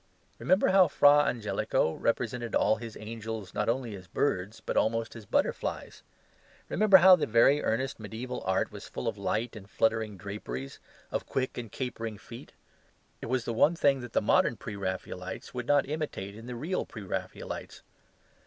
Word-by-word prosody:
Remember 185 +3 +3
how 190 -1 +6
Fra 145 0 +6
Angelico 110 -7 0
represented 120 0 -1
all 110 +1 +3
his 115 -2 -8
angels, 110 -2 -6
not 105 +2 0
only 120 -2 -1
as 90 -2 -11
birds, 105 -1 -1
but - - -4
almost 115 +1 +1
as 110 -3 -10
butterflies. - - -1 0.7
Remember 210 -2 +6
how 185 +1 +9
the 170 - -1
most 120 +6 +5
earnest 130 +4 -1
mediaeval 115 +4 -6
art 95 0 0
was - - -9
full - - -5
of - - -1
light 115 +2 -2
and 100 -1 -11
fluttering 110 -1 0
draperies, 85 -10 -6 0.3
of - - -3
quick 130 -1 -2
and 115 -4 -6
capering 115 -4 -4
feet. 115 +3 -11 0.7
It - - -5
was 125 0 0
the 115 - -2
one 150 +9 +4
thing 140 -4 +3
that 120 -1 -9
the - - +3
modern 110 +2 +3
Pre 105 +1 -7
raphaelites 95 -1 -5
could 125 -1 -5
not 145 -2 +3
imitate 145 -10 -4
in 115 +2 -10
the 125 - -5
real 165 +10 -2
Pre 110 - -9
raphaelites. 95 - -6
115 Hz, 170 wpm, -29 LUFS, 105-130 Hz, 0.7 s, how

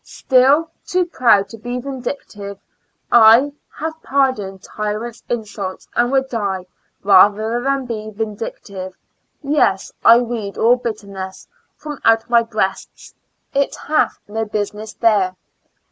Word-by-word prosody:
still 270 +5 +3 0.2
too 360 0 0
proud 235 - +3
to - - -10
be 245 +3 -4
vindictive, 245 -6 -6 0.5
I 235 +5 +7 0.2
Have 320 +1 -5
pardoned 235 -9 0
tyrant's 215 +2 -4
insults, 205 -5 -4
and 240 +1 +2
would 270 -1 +2
die 200 -6 -3 0.4
Rather 210 +4 +4
than 275 0 0
be 215 -3 -5
vindictive 200 -3 -6 0.3
— - - -49
yes, 280 -10 +1
I 230 - +8
weed 225 -4 -4
all 240 +2 +4
bitterness 200 -5 -6 0.3
From 295 -2 -8
out 225 0 +3
my 235 -1 +6
breast; 215 -4 -4 0.4
it 280 0 +1
hath 305 +1 0
no 220 +2 -2
business 210 0 -4
there. 205 -5 +2
225 Hz, 125 wpm, -19 LUFS, 205-255 Hz, 0.5 s, I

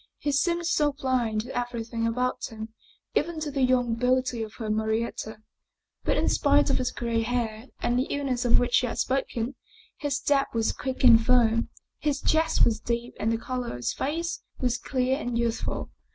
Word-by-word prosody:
He 290 - -1
seemed 340 +5 +1
so 300 -4 +2
blind 250 -6 0
to 245 +4 -8
everything 235 -1 -2
about 250 +2 -1
him, 220 0 -7 0.4
even 325 +1 0
to 300 -1 -2
the 275 -1 -1
young 250 -2 +3
beauty 250 0 +1
of 220 -1 -6
her 225 - -5
Marietta. 220 0 -2 0.6
But - - +1
in - - +1
spite 285 0 +3
of - - +2
his 250 -1 0
gray 235 -2 -1
hair 230 0 -2 0.2
and 245 +1 +2
the 260 - 0
illness 270 -3 -1
of 240 - +5
which 245 0 +3
he 250 - -1
had - - -4
spoken, 260 -2 -1 0.4
his 290 -2 -1
step 280 -3 +1
was 225 -1 +2
quick 260 0 -4
and 230 -3 +8
firm. 230 -2 +3 0.3
His 290 -2 0
chest 320 +2 +3
was 225 -2 +1
deep 235 +1 -3
and 220 - +1
the 230 - +1
color 250 +1 -4
of - - -5
his 120 -1 -2
face 330 +5 -2 0.2
was 250 -1 0
clear 260 +2 0
and 245 -4 -2
youthful. 235 -1 -2
245 Hz, 190 wpm, -27 LUFS, 230-275 Hz, 0.6 s, and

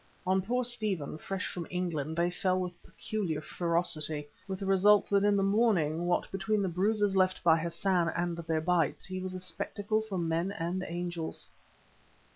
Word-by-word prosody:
On 190 +1 +3
poor 245 +6 0
Stephen, 210 -11 -2
fresh 195 +2 -3
from 175 -2 -5
England, 165 -4 -2
they 175 +1 +2
fell 185 +1 +1
with 180 -1 -5
peculiar 190 -8 -3
ferocity, 160 -3 -1 0.2
with 190 -1 -3
the 195 - -5
result 195 +2 +5
that 200 0 +4
in 205 0 +4
the 195 - +2
morning 190 -6 +2
what 175 - 0
between 200 +2 0
the - - +1
bruises 200 +3 +1
left 185 -1 +2
by 165 -2 +6
Hassan 170 +1 +1
and 175 0 0
their 165 -1 -1
bites, 165 -3 +1
he 185 -1 -4
was 185 0 -4
a - - -4
spectacle 205 +3 -1
for 215 -3 -5
men 170 +2 0
and 180 +2 -2
angels. 175 -1 -4
180 Hz, 175 wpm, -31 LUFS, 170-195 Hz, 0.2 s, by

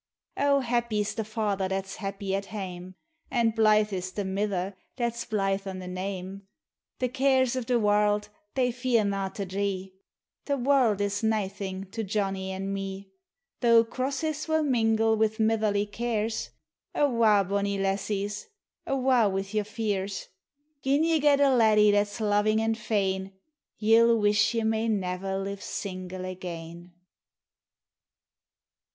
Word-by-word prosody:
O 280 0 +3
happy 235 -3 0
\s 205 - -2
the 220 - -2
father 210 -3 -1
that 190 0 -2
's 195 - -8
happy 195 -1 -4
at 195 0 -1
haine, 185 -3 -7 0.3
An' 235 -3 +2
blythe 215 -1 +3
is 185 0 -3
the 205 - -3
niither 195 -1 -2 0.2
that 235 -2 -1
's 235 - -5
blythe 195 -2 -1
o' 190 - -4
the 185 -1 -7
name. 190 +1 -5 0.5
The 255 - 0
cares 260 -1 +2
o' 255 - -1
the 245 +1 +1
warld 210 0 +2 0.3
thev 250 -2 +1
fear 240 -3 +1
na' 195 -1 -1
to 200 +1 -5
dree 190 0 -3 0.3
— - - -65
■ - - -49
The 280 -1 +1
warld 250 -6 +3
is 205 +1 -1
uaething 195 -3 -2
to 225 - -3
Johnny 195 -2 -2
an' 195 +1 -3
me. 195 0 -5 0.5
Though 230 -2 +6
crosses 280 +6 -3
will 315 0 +2
mingle 225 -4 +2
wi' 220 0 +4
mitherly 215 -2 +2
cares, 225 -1 -2 0.5
Awa', 230 -7 +4
bonnie 200 0 0
lassies 200 +1 -2 0.2
— - - -39
awa' 255 -5 +3
wi' 195 0 -2
your 215 -1 0
fears; 205 -3 -3 0.3
< 290 0 -48
Jin 280 +3 +2
ye 325 -1 +3
get 285 -1 +4
a 280 -1 +5
laddie 215 -3 +5
that 205 0 +3
's 205 +3 -9
loving 215 0 +2
and 225 0 +1
fain, 195 -3 -1 0.4
Ye 225 +1 +4
'11 230 0 +5
wish 210 +2 +3
ye 225 - +1
may 220 +1 +1
never 190 -2 -1
live 195 0 -4
single 185 -1 -5
again. 175 -1 -7
210 Hz, 160 wpm, -27 LUFS, 195-230 Hz, 0.5 s, Though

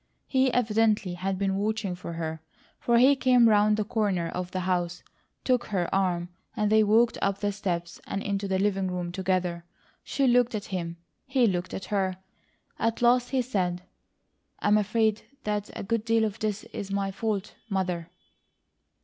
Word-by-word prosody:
He 260 -1 +2
evidently 215 -5 +2
had 190 +2 -2
been 195 0 0
watching 210 -1 -1
for 175 -1 -7
her, 160 -1 -4 0.4
for 235 -1 +2
he 265 +4 +6
came 250 -3 +5
around 210 0 +4
the 215 - +1
corner 200 -6 0
of 180 0 -4
the 185 0 -3
house, 180 -1 -1 0.4
took 250 -2 +2
her 185 -4 -2
arm, 180 -3 +1 0.3
and 210 0 +1
they 220 0 +6
walked 225 +3 +3
up 195 0 +1
the 205 0 -1
steps 175 -4 -4
and 200 - -3
into 200 0 -2
the 190 -1 +1
living 195 -1 +1
room 180 -1 -3
together. 180 -2 -1 0.4
She 275 - 0
looked 245 -2 +3
at 205 - -4
him; 170 -2 -3 0.3
he 265 -2 +3
looked 180 -4 -1
at 190 - -5
her. 190 -2 0 0.6
At 230 +1 0
last 245 +1 +4
he 260 -2 +1
said: 180 -7 -1 0.7
"I'm 210 +1 +3
afraid 215 +1 +1 0.2
that 210 -1 -2
a - - -5
good 230 +1 -1
deal 225 -1 +2
of 215 0 -4
this 215 -1 -2
is 200 -2 -5
my 195 0 -1
fault, 210 0 -2 0.2
Mother." 180 -4 -2
200 Hz, 175 wpm, -27 LUFS, 185-220 Hz, 0.7 s, he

